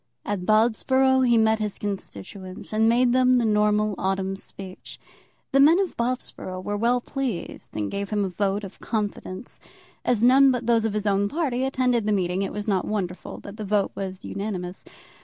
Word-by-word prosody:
At 195 -3 -3
Bobsborough 260 +4 +3
he 235 - +5
met 220 0 +3
his 210 -2 -3
constituents, 190 - -6
and 220 +1 +4
made 240 +1 +4
them 255 0 +4
the 240 -2 +2
normal 210 0 +2
autumn 190 0 -1
speech. 190 -1 -10 0.5
The 275 - +3
men 315 +6 +7
of 390 -2 -1
Bobsborough 235 -6 -3
were 205 - -2
well 240 +4 +2
pleased 245 - -4
and 105 -1 -2
gave 200 0 -3
him 205 -2 0
a - - -2
vote 200 +3 -1
of 195 -1 -9
confidence. 205 -1 -4 0.4
As 235 -3 +1
none 270 +3 +7
but 250 -2 0
those 230 -1 +3
of 220 - -1
his 210 0 -2
own 200 0 +2
party 265 -4 -1
attended 250 -4 +1
the 210 - +3
meeting, 185 -1 0
it 195 - -2
was 210 +1 -5
not 195 -3 +1
wonderful 190 -4 -4
that 200 +1 -10
the 215 - -5
vote 205 0 +1
was 190 -1 -5
unanimous. 190 -3 -5
210 Hz, 185 wpm, -25 LUFS, 195-245 Hz, 0.5 s, men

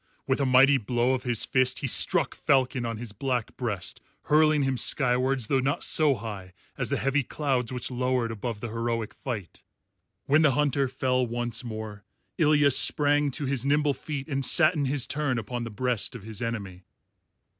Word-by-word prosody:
With 130 +1 0
a 135 - +1
mighty 135 +2 +5
blow 120 +3 0
of 130 - -2
his 120 -3 0
fist 130 -1 +1
he - - -4
struck - - +4
Falcon 130 -2 0
on 115 -1 -4
his 115 -1 -7
black 125 +2 -3
breast, 105 -7 -4 0.2
hurling 155 -1 +3
him 135 -1 0
skywards, 125 0 +1
though 135 +4 +1
not 135 +3 -1
so 150 -3 +2
high 100 -5 -8 0.2
as - - -2
the - - -1
heavy 135 +2 0
clouds 130 -3 -2
which 125 0 -4
lowered 125 -2 -1
above 110 0 -5
the 120 - -5
heroic 115 -1 -3
fight. 105 -9 -7 0.6
When 145 +3 +3
the 150 -4 +3
Hunter 140 -1 +1
fell 125 0 -1
once 120 0 -3
more, 110 -3 -7 0.4
Ilya 150 -2 +4
sprang 145 +2 +4
to 140 +2 -3
his 135 -2 0
nimble 145 +1 +1
feet 140 0 -6
and 135 -3 -2
sat 155 +5 +6
in 150 -4 -1
his 135 -1 0
turn 145 -3 -2
upon 120 +2 -5
the - - -6
breast 125 +2 -2
of 115 - -9
his 110 -1 -7
enemy. 100 -6 -5
125 Hz, 185 wpm, -26 LUFS, 115-140 Hz, 0.6 s, sat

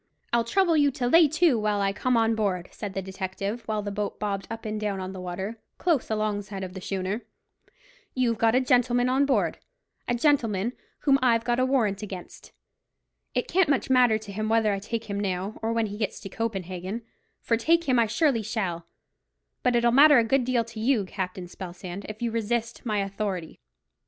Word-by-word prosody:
"I'll 235 -1 +4
trouble 345 +7 +2
you 290 -2 +4
to 265 -2 -3
lay 330 +5 +7
to 315 -4 +3
while 210 -1 0
I 195 0 +1
come 250 +4 +1
on 225 0 +3
board," 195 -5 -1
said 200 -3 -6
the 195 - -2
detective, 195 +4 -4
while 215 -1 -1
the 205 - -4
boat 205 0 -3
bobbed 200 -2 -2
up 225 0 -6
and 215 0 -3
down 205 -2 -1
on 185 0 -5
the 185 - -7
water, 190 +5 -5 0.2
close 330 -7 +1
alongside 205 -2 -2
of 180 -1 -6
the 190 - -7
schooner. 195 +4 -2 0.9
"You've 240 -4 +1
got 225 +1 +3
a 255 - +4
gentleman 245 -1 +3
on 270 +2 +3
board—a 285 - -3
gentleman 235 -5 +1 0.3
whom 275 -2 +4
I've 230 -3 +3
got 240 +1 0
a 255 - +3
warrant 220 -7 +1
against. 190 -4 -9 0.8
It - - 0
can't 370 -2 +3
much 275 -2 +1
matter 250 -4 +5
to 215 -2 -9
him 215 +2 -2
whether 225 -2 +3
I 195 - -2
take 225 +2 -4
him 200 -1 -3
now, 195 +1 -3
or 225 +1 -1
when 230 -1 +1
he 205 0 -6
gets 215 - -2
to 195 - -7
Copenhagen; 195 0 -4 0.4
for 230 - +1
take 330 +9 +3
him 260 -6 +2
I 230 - +4
surely 235 +1 +2
shall; 190 -6 -3 0.7
but 250 -1 +2
it'll 235 0 +4
matter 290 +3 +8
a 235 - +5
good 250 +3 +2
deal 245 -2 +2
to 230 -1 -10
you, 225 -3 +2
Captain 185 -1 -4
Spelsand, 180 +1 -8
if 215 +2 -7
you 235 - 0
resist 230 +2 -2
my 215 -1 0
authority." 195 -4 -4
220 Hz, 200 wpm, -26 LUFS, 195-245 Hz, 0.9 s, matter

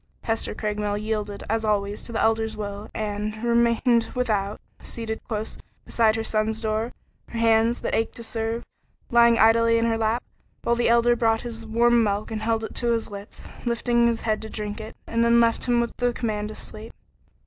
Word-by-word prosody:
Hester 225 0 -1
Craigmile 210 -1 -2
yielded, 210 -1 -3
as 225 +1 0
always, 205 -1 0
to - - -9
the 225 - -2
Elder's 220 -1 +1
will, 205 0 -5
and 215 +1 -3
remained 235 0 +3
without, 210 -5 0 0.2
seated 225 -1 -4
close 220 -1 -4 0.3
beside 220 -2 +3
her 225 - -2
son's 220 0 0
door, 220 +1 -1 0.4
her 235 - -6
hands, 230 +1 +3
that - - -2
ached 225 - 0
to 235 - -8
serve, 225 +1 -3 0.5
lying 235 -1 +6
idle 225 +1 +5
in 230 0 +3
her 225 -1 +1
lap, 225 +2 +1 0.4
while 235 - +2
the 235 -1 +2
Elder 235 +1 +4
brought 225 -1 +2
him 240 - -5
his 225 0 -8
warm 235 +1 +4
milk 205 +1 -1
and 220 -1 -3
held 225 0 0
it - - -5
to 235 -1 +1
his 225 -2 -2
lips, 200 +1 -9 0.2
lifting 235 0 +2
his 230 -1 0
head 215 -1 0
to 220 - -6
drink 210 0 -4
it, 220 +1 -9
and 230 0 +1
then 235 0 +5
left 230 -1 +2
him 240 -1 +3
with 235 0 -1
the 245 0 +1
command 210 -3 -2
to 215 - -8
sleep. 215 +1 -8
225 Hz, 200 wpm, -25 LUFS, 215-235 Hz, 0.5 s, lying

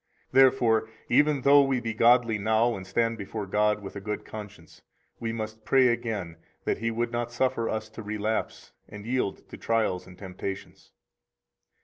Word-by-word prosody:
Therefore, 120 -4 +4 0.2
even 145 +2 +3
though 140 +2 +7
we 135 -2 +1
be 115 -1 -3
godly 115 -1 +4
now 110 +3 +2
and 95 -1 -8
stand 115 +1 0
before 105 +1 -5
God 105 +2 +1
with 95 - -8
a 100 - -6
good 105 +1 -4
conscience, 105 -6 -10 0.4
we 115 -1 -3
must 110 -1 -6
pray 130 +3 +4
again 110 -8 -3 0.3
that - - -1
He 115 +1 -1
would 115 +1 -2
not 120 0 -2
suffer 120 -2 0
us 110 0 -3
to 115 - -9
relapse 105 +1 -3 0.2
and 105 0 -10
yield 125 -4 -2
to - - -9
trials 110 -6 0
and 90 -1 -14
temptations. 95 0 -7
110 Hz, 165 wpm, -27 LUFS, 105-120 Hz, 0.4 s, though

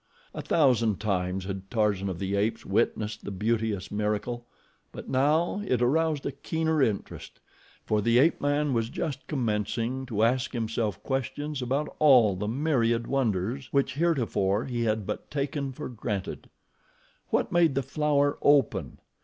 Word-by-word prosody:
A - - -5
thousand 120 - +2
times 95 -3 -1
had 95 0 -6
Tarzan 105 -4 +1
of 90 - -4
the 95 +2 -2
Apes 105 +3 -1
witnessed 105 0 0
the - - -5
beauteous 105 0 -1
miracle; 105 +3 -2 0.4
but - - -9
now 150 +9 +2
it 130 - 0
aroused 150 +4 +1
a - - -1
keener 160 +2 -1
interest, 110 -6 -2 0.5
for 105 -1 +1
the 115 +3 +3
ape 150 +7 +4
man 145 0 +1
was 115 -1 0
just 140 +1 -4
commencing 115 0 -2
to 110 -3 0
ask 125 +2 +1
himself 115 -3 -2
questions 140 +2 -3
about 135 +5 -2
all 125 -10 +6
the 105 +3 -3
myriad 120 -3 +1
wonders 120 -1 -1
which 140 -1 +1
heretofore 120 - +1
he 120 -3 -2
had 110 -2 0
but - - -5
taken 140 -1 -2
for 125 - -6
granted. 105 -5 -5 0.8
What - - 0
made 170 -5 +3
the 135 - +1
flower 145 +1 +1
open? 145 -4 +2
120 Hz, 150 wpm, -27 LUFS, 105-140 Hz, 0.8 s, all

